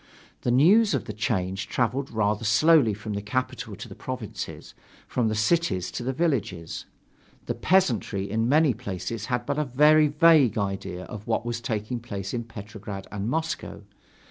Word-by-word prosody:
The - - -1
news 180 - +5
of 135 - -2
the 105 - -5
change 95 -2 -2
traveled 125 +5 -1
rather 105 -1 0
slowly 115 +1 +4
from 105 +1 -6
the 100 - -3
capital 130 +5 -3
to - - -8
the - - -10
provinces, - - -6 0.3
from 120 -3 0
the 110 - 0
cities 110 - +1
to - - -5
the 125 +2 -1
villages. 125 - -2 0.6
The - - -1
peasantry 120 - +1
in 110 +3 0
many 150 -1 +4
places 110 -1 -5
had 125 -1 -1
but 140 +2 -1
a - - +2
very 150 +3 +5
vague 150 -6 +5
idea 95 -3 -3
of 105 0 -9
what 115 0 0
was 120 0 -3
taking 110 +2 -3
place 100 -5 -6
in 120 -1 -3
Petrograd 105 -3 -8
and 105 +1 -3
Moscow. 160 -7 -3
115 Hz, 170 wpm, -26 LUFS, 105-140 Hz, 0.6 s, news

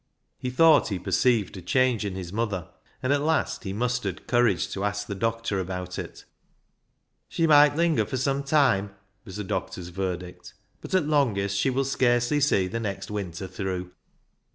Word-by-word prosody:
He 125 - -3
thought 160 +5 +5
he 100 - -2
perceived 110 +1 +1
a - - -7
change 125 +3 +1
in 100 -2 -3
his 90 -1 -6
mother, 105 -6 -2 0.3
and 130 +2 +2
at 145 - +1
last 155 -5 0
he 95 - -3
mustered 115 -3 -2
courage 120 -7 +2
to 100 - -4
ask 105 0 -1
the 105 - -5
doctor 115 0 -1
about 90 -1 -4
it. - - -8 0.5
" - - -49
She 165 - 0
might 145 -2 +6
linger 165 -1 +2
for 130 - -4
some 135 +2 0
time," 130 -9 +2 0.3
was 95 - -9
the 105 - -4
doctor's 95 -2 -4
verdict, 90 -1 -5
" - - -42
but - - -3
at 185 -5 +3
longest 110 -10 +1
she 100 +7 +2
will 135 +1 0
scarcely 125 +1 +2
see 130 -9 +2
the 100 +5 -3
next 100 -3 -4
winter 95 -3 -4
through." 95 -1 -4
105 Hz, 180 wpm, -26 LUFS, 95-130 Hz, 0.5 s, might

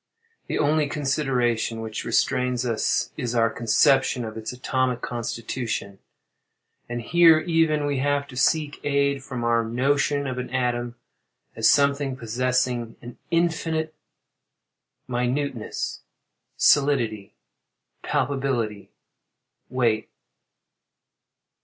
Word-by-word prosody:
The - - -2
only 150 0 +2
consideration 130 -6 0
which 110 -1 -5
restrains 125 -1 +1
us 115 -2 0
is 120 0 -3
our 115 -1 +3
conception 120 +2 +2
of 110 -1 -7
its 110 -1 -5
atomic 125 0 -1
constitution; 115 -3 -4 0.9
and 120 0 -4
here, 165 +4 +6
even, 160 -3 +1
we 145 -2 -1
have 145 +1 0
to 125 - -10
seek 145 +3 +1
aid 140 -1 +1
from 130 -3 -5
our 115 0 +2
notion 140 +4 +1
of 130 -2 -3
an 125 - -5
atom, 120 -1 -1 0.6
as 110 - +4
something 140 -2 +2
possessing 120 0 -1
in 120 0 -11
infinite 165 -2 0 1.1
minuteness, 125 0 -2 0.6
solidity, 115 -8 +2 0.7
palpability, 125 -7 -1 0.8
weight. 120 -4 0
125 Hz, 100 wpm, -24 LUFS, 120-145 Hz, 1.1 s, here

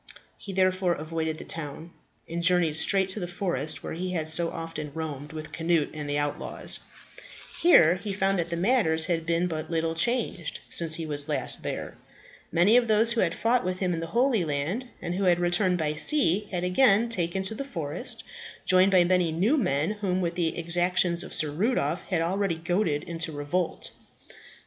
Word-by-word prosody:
He 200 - -9
therefore 185 -1 +1
avoided 160 0 -4
the - - -7
town, 160 +1 -5 0.4
and 170 +1 -4
journeyed 170 -3 +3
straight 190 +3 +3
to 190 - -3
the 175 - -4
forest, 175 -3 -3
where - - -5
he 180 +2 -4
had 160 -3 -2
so 165 +1 +3
often 165 -3 -6
roamed 150 -3 -6
with 155 0 -8
Cnut 165 -2 0
and 150 -2 -6
the 145 - 0
outlaws. 145 0 -2 0.8
Here 175 - +6
he 200 +2 -5
found 195 -1 0
that 170 0 -3
matters 170 -6 +2
had 165 -2 -2 0.2
but 155 -2 -5
little 165 -1 -1
changed 205 -2 0
since 165 -2 0
he 165 - -4
was 145 -2 +3
last - - -1
there. - - -5 0.5
Many 180 +8 +4
of 245 -1 +2
those 220 +2 +4
who 235 - 0
had 170 -2 0
fought 240 +2 +1
with 185 0 -2
him 185 -2 -1
in 165 - -3
the 165 - -5
Holy 245 -6 +3
Land, 160 - -2 0.2
and 175 0 -3
who 195 +2 -1
had 175 -1 +3
returned 175 +1 +1
by 155 -2 -1
sea, 210 - +3
had 180 -2 -3
again 210 +4 +3
taken 190 -4 0
to 190 - +1
the 250 - -5
forest, 165 - -4 0.4
joined 185 +1 +5
by 185 -2 +5
many 180 -1 +1
new 190 - +1
men 180 - 0
whom 195 -3 -2
the 170 -2 -1
exactions 175 +1 +1
of - - -10
Sir 150 -1 +2
Rudolph 175 - -1
had 175 -4 0
already 190 +1 -1
goaded 165 -2 -1
into 165 -2 -3
revolt. 155 +4 -3
175 Hz, 185 wpm, -26 LUFS, 160-190 Hz, 0.8 s, Here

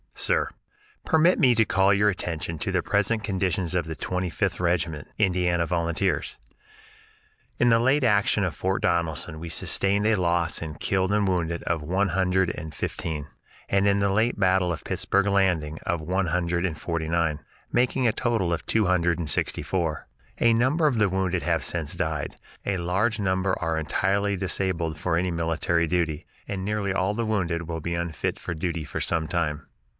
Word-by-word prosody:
Sir: - - +1 0.6
Permit 165 +2 +4
me 125 -6 +5
to 110 0 +4
call 95 0 +3
your 105 +1 +3
attention 85 -3 -3
to - - -2
the - - 0
present 105 +2 +1
condition 95 -3 0
of 85 - -1
the 80 0 -5
Twenty 90 +3 -2
fifth - - -1
Regiment, 85 -4 -1
Indiana 90 -3 +2
Volunteers. 85 +3 -1 1.2
In 120 - +4
the 115 0 +5
late 135 +4 +3
action 105 -2 +3
at 90 -4 -1
Fort 95 +6 -1
Donelson 85 -2 0
we 85 +1 -6
sustained 100 +5 +1
a 110 - +4
loss 85 -2 0
in 80 -2 -5
killed 95 +3 0
and 105 -1 +2
wounded 85 -2 -1
of 80 -2 -1
one 95 +6 0
hundred 95 0 +1
and 80 0 -7
fifteen, 75 -2 -4 0.4
and 100 +1 +2
in 100 0 +3
the 100 0 +2
late 110 +3 +1
battle 95 -2 +3
of 80 - -5
Pittsburg 100 +1 +1
Landing 90 -6 +1
of 85 -2 0
one 90 +4 0
hundred 85 +1 0
and 80 -4 -5
forty 85 -2 -2
nine, 85 -3 +1 0.3
making 125 +1 +2
a - - +4
total 110 -9 0
of 85 - -3
two 110 -2 +2
hundred 85 -2 +2
and 80 -3 -3
sixty - - 0
four. 85 -5 -2 0.3
A 115 -1 +5
number 135 +8 +3
of 130 -5 +1
the 105 -2 +3
wounded 95 -1 -1
have 85 -1 0
since 80 -4 -2
died; 80 -3 -3 0.3
a 100 -1 0
large 95 +6 0
number 95 -1 0
are 80 -1 -1
entirely 100 +5 0
disabled 90 -4 -1
for 85 +1 -1
any 90 +2 0
military 85 0 0
duty, 80 -3 -1 0.2
and 95 -2 -4
nearly 105 -2 -1
all 95 +1 +1
of 105 - -5
the 115 - 0
wounded 90 -6 -1
will 80 -1 -4
be 85 +2 -2
unfit 85 -3 -2
for - - -4
duty 85 -1 -3
for - - -5
some 80 -2 0
time. 75 -4 -2
90 Hz, 185 wpm, -25 LUFS, 85-100 Hz, 1.2 s, me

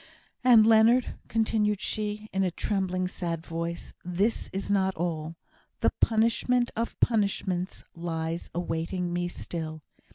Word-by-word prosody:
"And, 235 -4 +7
Leonard," 225 +3 +5
continued 215 -2 +1
she, 210 -1 -3
in 195 0 +2
a 185 - +2
trembling, 185 0 -1
sad 170 -3 -4
voice, 170 0 -4
"this 190 +6 0
is 195 +1 -3
not 190 -1 +2
all. 165 -1 -3 0.5
The - - +3
punishment 235 +2 +2
of 230 +1 -3
punishments 200 -5 0
lies 165 0 -3
awaiting 175 +1 -2
me 175 0 0
still. 160 -3 -6
190 Hz, 125 wpm, -28 LUFS, 170-215 Hz, 0.5 s, And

